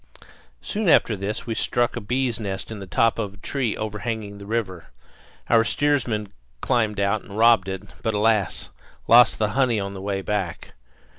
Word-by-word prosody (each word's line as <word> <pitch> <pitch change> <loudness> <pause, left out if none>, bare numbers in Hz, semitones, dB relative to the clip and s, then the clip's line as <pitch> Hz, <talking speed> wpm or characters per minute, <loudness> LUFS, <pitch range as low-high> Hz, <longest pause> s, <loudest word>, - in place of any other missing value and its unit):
Soon 210 -3 -1
after 115 - +4
this 100 +3 -4
we 115 - -2
struck 120 +2 0
a 120 - -4
bees' 125 +2 -1
nest 100 -1 -5
in 110 - -6
the 95 - -8
top 115 +4 +2
of 100 -1 -4
a - - -17
tree 120 +4 -2
overhanging 105 -1 -4
the 100 - -10
river; 100 -7 -3 0.6
our 115 -1 +5
steersman 120 -6 0 0.3
climbed 110 - 0
out 100 +1 +1
and 100 - -10
robbed 115 -3 +5
it, 95 -1 -5 0.2
but, 110 -1 -1
alas! 105 -3 +1 0.4
lost 120 0 +7
the 105 -1 +1
honey 120 -1 +1
on 100 0 -4
the 95 - -7
way 100 -1 -3
back. 95 -5 -3
110 Hz, 175 wpm, -23 LUFS, 100-115 Hz, 0.6 s, lost